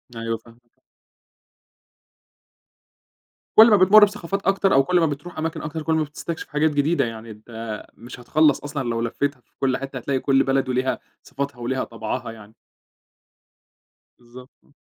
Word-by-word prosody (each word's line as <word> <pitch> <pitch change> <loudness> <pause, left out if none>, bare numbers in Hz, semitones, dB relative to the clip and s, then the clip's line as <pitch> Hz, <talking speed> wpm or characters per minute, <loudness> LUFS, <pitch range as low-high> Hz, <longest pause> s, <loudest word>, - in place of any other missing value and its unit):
أيوه 115 0 -3
فاهمك. 115 +1 -22 2.8
كل 225 +2 +9
ما 210 - +6
بتمرّ 200 +3 +7
بثقافات 195 -1 -5
أكتر 195 0 +2
أو 135 - +5
كل 180 +5 +2
ما 165 - +3
بتروح 155 +4 -5
أماكن 160 +1 -3
أكتر 155 +1 -5
كل 160 +1 0
ما 160 - +2
بتستكشف 155 +2 -6
حاجات 150 +1 +1
جديدة 145 +4 +1
يعني، 115 -1 -7
أنت 110 0 -8
مش 120 +2 -11
هتخلّص 150 +4 +3
أصلًا 140 -3 -4
لو 115 0 -1
لفيتها 130 +4 -2
في - - -43
كل 130 -1 +1
حتّة 135 -1 -7
هتلاقي 130 +2 -2
كل 135 0 +3
بلد 135 -1 0
وليها 130 +1 0 0.2
صفاتها 140 -1 -5
وليها 130 +2 -2
طَبْعَها 115 +1 -5
يعني. 110 -1 -14 1.6
بالضبط، 125 +2 -14
آه. 145 - -29
135 Hz, 155 wpm, -22 LUFS, 120-155 Hz, 2.8 s, كل